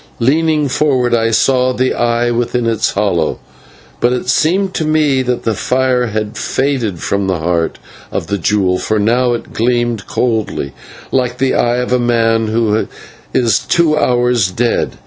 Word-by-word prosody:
Leaning 150 +4 +1
forward 130 -3 +1
I 115 -1 +2
saw 130 +3 +2
the 130 +1 0
eye 120 0 0
within 120 0 -1
its 115 -2 0
hollow; 95 -6 0 0.6
but 120 - +2
it 125 0 -2
seemed 185 +7 +1
to - - -1
me 155 -3 +2
that 125 -1 -2
the 115 - 0
fire 125 +2 0
had 105 -1 -4
faded 130 -9 -1
from 100 -1 -1
the 95 -2 0
heart 85 0 -1 0.3
of - - -3
the 100 - -3
jewel, 95 -1 +1
for 110 - -1
now 120 +4 +2
it 120 - -6
gleamed 120 -2 0
coldly, 110 - -2 0.4
like 125 -2 0
the 135 +1 +1
eye 120 0 +1
of 125 0 -1
a 125 - +3
man 115 -2 +1
who 110 -1 0 0.4
is 115 -4 +2
two 165 -3 +2
hours 125 -7 +2
dead. 115 +6 -1
120 Hz, 165 wpm, -15 LUFS, 110-130 Hz, 0.6 s, a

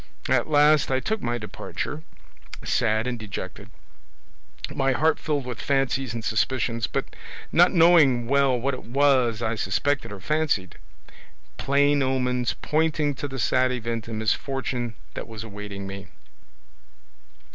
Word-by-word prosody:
At - - +2
last 150 0 +4
I 130 0 +2
took 220 +9 -2
my 120 0 -1
departure, 120 +6 -5 0.6
sad 110 +1 +1
and 125 -2 -3
dejected, 100 -1 -7 1.0
my 135 0 +1
heart 160 +5 +2
filled 145 -4 -2
with 120 -4 -6
fancies 135 -3 0
and 115 -1 -5
suspicions, 115 0 0
but - - -4 0.4
not 175 +2 +5
knowing 165 -9 +5
well 135 -1 +2
what 135 +3 -1
it 130 - -6
was 130 -3 +2
I 110 - 0
suspected 115 +6 -1
or 100 - -7
fancied; 145 - -1 0.8
plain 145 +1 +2
omens 125 -2 0
pointing 155 -1 +1
to 140 +2 -5
the 135 -1 -6
sad 130 +1 +2
event 115 -2 -3
and 115 -1 -4
misfortune 120 +1 -2 0.2
that - - -6
was 110 -2 -7
awaiting 100 -2 -7
me. 100 0 -7
125 Hz, 135 wpm, -25 LUFS, 110-145 Hz, 1.0 s, not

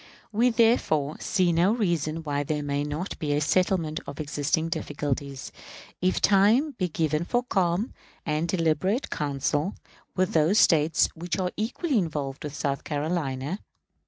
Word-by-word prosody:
We, 230 +4 +3
therefore, 225 - +2
see 180 -3 +1
no 175 +6 +3
reason 165 -7 -1
why 145 -2 -1
there 150 +1 -2
may 145 0 -1
not 150 +6 -4
be 145 -2 -1
a 145 - +2
settlement 165 0 +1
of 140 - -7
existing 155 +2 -1
difficulties, 145 -4 -3 0.5
if 185 +1 +2
time 210 +10 +4
be 185 - +1
given 155 0 0
for 245 +7 0
calm 190 -1 0 0.3
and 155 +1 0
deliberate 185 - 0
counsel 145 +4 -1 0.4
with 185 -1 +1
those 160 +6 +3
States 160 -4 +4
which 170 +1 -3
are 180 -2 -1
equally 250 +5 0
involved 145 -6 -3
with 150 -1 -5
South 140 -2 -2
Carolina. 150 +1 -2
165 Hz, 145 wpm, -26 LUFS, 145-190 Hz, 0.5 s, time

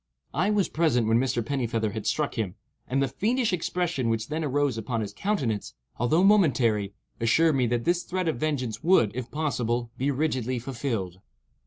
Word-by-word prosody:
I 180 +7 +1
was 210 -3 +2
present 135 -9 +1
when 115 +1 +4
Mr. 120 -3 0
Pennifeather 115 -5 -1
had 110 0 -5
struck 150 -2 0
him, 105 -5 -3 0.3
and 135 +2 +1
the - - +1
fiendish 220 - 0
expression 175 -7 -1
which 115 0 -1
then 160 +1 -2
arose 145 -2 +1
upon 115 +1 -2
his 100 -1 -5
countenance, 130 - -2 0.2
although 155 +10 +2
momentary, 125 - +3 0.2
assured 155 +8 +3
me 125 -2 +2
that 120 0 -1
his 175 0 +2
threat 185 0 -3
of 155 -7 -1
vengeance 135 -7 -2
would, 160 - +4
if 125 0 -5
possible, 120 -6 -1
be 135 +3 +1
rigidly 130 -3 0
fulfilled. 115 -7 -3
130 Hz, 175 wpm, -26 LUFS, 115-160 Hz, 0.3 s, when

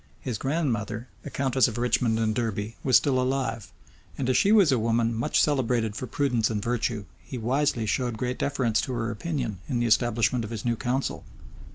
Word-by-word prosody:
His 120 -5 -4
grandmother, 125 -6 -2
the - - -7
countess 130 -3 +2
of 115 -1 -5
Richmond 120 -1 +1
and 110 -1 +1
Derby, 110 -1 -2
was 130 - +6
still 130 -3 +1
alive; 130 -4 -2 0.5
and 130 - -2
as - - 0
she 200 - +4
was 200 -9 +6
a 130 - +3
woman 115 +1 +1
much 115 +2 +1
celebrated 120 -7 +1
for 130 - -5
prudence 125 -6 +1
and 110 -2 -1
virtue, 115 -1 -1 0.2
he 130 - -7
wisely 125 0 0
showed 120 +2 -1
great 125 +2 -3
deference 125 -6 +1
to 130 - -4
her 115 -1 -2
opinion 120 - -3
in 130 - 0
the 120 - +1
establishment 115 +1 +2
of 110 - -5
his 115 -1 -6
new 120 -1 +1
council. 130 +3 -2
120 Hz, 195 wpm, -26 LUFS, 110-130 Hz, 0.5 s, was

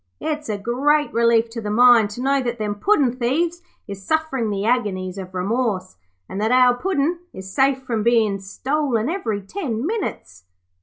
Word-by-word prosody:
'It's 305 -4 -4
a 210 - -1
great 280 +8 +1
relief 235 0 +3
to 230 0 -7
the 210 - -4
mind 235 -1 +6
to 240 +5 -6
know 275 0 +2
that 240 -1 -3
them 210 -2 -2
puddin' 265 - +2
thieves 325 +8 -1 0.3
is 200 -1 -7
sufferin' 290 -2 -1
the 200 0 -2
agonies 195 -6 -1
of 185 0 -9
remorse, 195 - -2 0.3
and 195 - -5
that 220 +2 +1
our 250 -1 +5
Puddin' 330 +3 -1
is 190 0 -9
safe 270 -1 +2
from 230 -4 -2
bein' 220 -3 +2
stolen 255 +4 -1
every 225 - -2
ten 245 - -4
minutes.' 95 - -4
235 Hz, 170 wpm, -21 LUFS, 205-275 Hz, 0.3 s, mind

